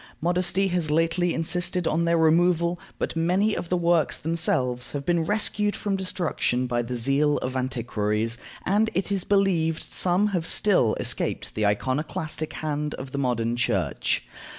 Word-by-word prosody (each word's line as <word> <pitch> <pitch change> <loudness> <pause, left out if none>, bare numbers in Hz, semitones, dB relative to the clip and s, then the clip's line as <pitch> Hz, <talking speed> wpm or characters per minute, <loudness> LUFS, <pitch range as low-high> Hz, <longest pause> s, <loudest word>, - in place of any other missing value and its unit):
Modesty 180 +3 +1
has 175 -4 0
lately 165 +3 +1
insisted 175 +2 0
on 170 +2 +1
their 170 0 +2
removal, 170 +1 +3 0.2
but - - -3
many 185 +6 +1
of 170 - -5
the 180 - +1
works 170 -3 +2
themselves 130 -6 0
have 140 -1 -4
been 170 -2 +1
rescued 210 +1 +1
from 200 -2 -2
destruction 175 -9 -1
by 120 -1 0
the 120 +1 -5
zeal 140 +5 +2
of 130 +1 -4
antiquaries, 115 -3 -1 0.3
and 210 +3 +2
it 190 +3 -1
is 195 -2 0
believed 180 -5 0
some 185 +3 +3
have 175 -5 -1
still 180 - +3
escaped - - -2
the 105 -1 +1
iconoclastic 150 - -2
hand 150 -1 -3
of 130 0 -8
the 140 - -3
modern 120 -3 0
Church. 120 - 0
165 Hz, 155 wpm, -25 LUFS, 130-180 Hz, 0.3 s, removal